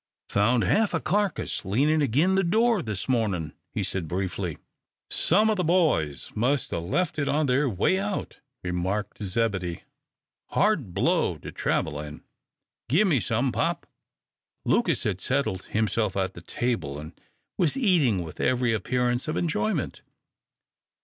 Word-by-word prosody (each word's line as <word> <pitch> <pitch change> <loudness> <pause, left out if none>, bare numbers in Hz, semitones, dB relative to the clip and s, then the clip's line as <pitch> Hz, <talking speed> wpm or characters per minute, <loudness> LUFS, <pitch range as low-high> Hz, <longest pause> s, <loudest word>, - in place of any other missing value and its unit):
"Found 115 +4 +3
half 215 0 +2
a - - +1
carcass 205 -1 -1
leanin' 140 +11 +2
agin 145 +8 +3
the 195 0 +3
door 225 +4 +3
this 105 -5 -4
mornin'," 100 - 0 0.2
he - - -2
said, 90 -4 -3
briefly. 90 0 -3 0.5
"Some 210 +6 +4
o' 220 - +3
the 185 -3 -1
boys 155 - +1
must 130 +5 0
'a' 85 - 0
left 150 - -1
it 140 - 0
on 150 +2 +2
their 135 +1 +2
way 115 - +1
out," 200 0 -4 0.2
remarked 95 +5 -2
Zebedee. 95 -4 -1 0.6
"Hard 155 - +1
blow - - +2
to - - -9
travel 75 -2 -1
in. 75 0 -8 0.7
Gimme 165 - +4
some, 120 +4 0
pop." - - -1 0.8
Lucas - - +2
had 95 -2 -2
settled 130 -9 -1
himself 110 -2 0
at 95 -1 0
the 85 - -10
table, 90 - -2
and 75 +2 -8 0.5
was 175 - +2
eating 155 - +3
with 80 - -10
every 125 -2 +2
appearance 125 +4 0
of 155 - -1
enjoyment. 110 -11 -1
120 Hz, 145 wpm, -26 LUFS, 95-155 Hz, 0.8 s, Some